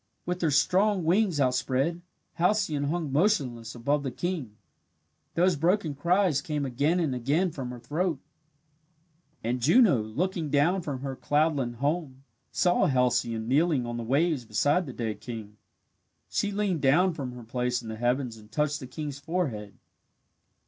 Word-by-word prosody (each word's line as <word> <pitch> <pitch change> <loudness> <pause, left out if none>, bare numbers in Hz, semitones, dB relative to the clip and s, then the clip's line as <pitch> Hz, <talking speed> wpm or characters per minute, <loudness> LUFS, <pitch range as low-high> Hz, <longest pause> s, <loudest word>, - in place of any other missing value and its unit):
With 180 +1 -3
her 165 - +2
strong 185 +7 +3
wings 180 -1 +2
outspread, 135 +5 +1 0.4
Halcyone 175 -6 +1
hung 160 -3 -2
motionless 135 - +1
above 140 +5 0
the 140 - -3
king. 145 - -4 0.8
Those 180 +1 +3
broken 165 +1 +1
cries 170 +1 +2
came 150 -2 -2
again 145 +7 +1
and 155 -6 0
again 145 +9 +1
from 135 -4 -5
her 125 - -7
throat. 155 +5 -1 1.2
And 120 +2 -1
Juno, 185 - +5
looking 155 - -2
down 160 +7 +2
from 140 -6 -5
her 135 -1 -4
cloudland 145 -4 0
home, 140 0 -2 0.3
saw 180 -1 +3
Halcyone 120 -4 +1
kneeling 145 0 +2
on 120 0 -4
the 120 - -4
waves 140 +3 +1
beside 145 - +1
the - - -5
dead 110 -4 -3
king. 110 -3 -8 0.7
She 205 - -1
leaned 200 -6 -1
down 170 +7 +4
from 135 -5 -5
her 125 -1 -9
place 125 +1 -2
in - - -9
the 110 - -4
heavens 120 0 0
and 105 0 -16
touched 150 +2 0
the 130 - -8
king's 145 +1 -6
forehead. 140 - -3
145 Hz, 155 wpm, -27 LUFS, 125-175 Hz, 1.2 s, Juno